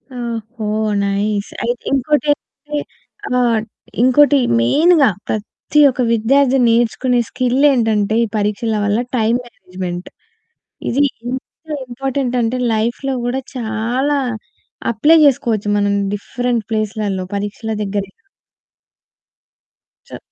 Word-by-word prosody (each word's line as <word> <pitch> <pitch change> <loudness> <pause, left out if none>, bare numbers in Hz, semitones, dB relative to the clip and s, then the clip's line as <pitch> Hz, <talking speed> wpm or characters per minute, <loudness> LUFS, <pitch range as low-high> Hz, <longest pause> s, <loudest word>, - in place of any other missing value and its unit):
ఓహో! 230 -2 -5 0.4
నైస్ 200 +1 -1
అయితే 240 +1 -2
ఇంకోటేంటంటే, 295 +2 -1 0.6
ఆహ్, 240 -2 +3 0.4
ఇంకోటి 285 +3 +5 0.2
మెయిన్‌గా 300 - +4 0.2
ప్రతి 220 +7 -2
ఒక్క 255 0 -2
విద్యార్థి 265 +4 +3
నేర్చుకునే 240 +2 +2
స్కిల్ 255 +2 +1
ఏంటంటే 220 -4 +1
ఈ 230 - 0
పరీక్షల 210 +2 -1
వల్ల 205 +2 +1 0.2
టైమ్ 225 +2 +2
మేనేజ్మెంట్ 185 -6 -7 0.8
ఇది 280 +4 +2 0.2
ఎంత 250 +2 -3 0.5
ఇంపార్టెంట్ 255 0 -2
అంటే 235 +2 -1
లైఫ్‌లో 235 +5 -1
కూడా 255 +2 -1
చాలా 245 +5 -1 0.7
అప్లై 295 +9 +5
చేసుకోవచ్చు 230 -6 +1
మనం 205 0 +1 0.2
డిఫరెంట్ 235 +2 -2
ప్లేస్‌లలో 210 -3 -2
పరీక్షల 205 +2 -4
దగ్గరే 200 -1 -3
కా 370 - -40 1.8
చ - - -9
235 Hz, 100 wpm, -18 LUFS, 215-260 Hz, 1.8 s, ఇంకోటి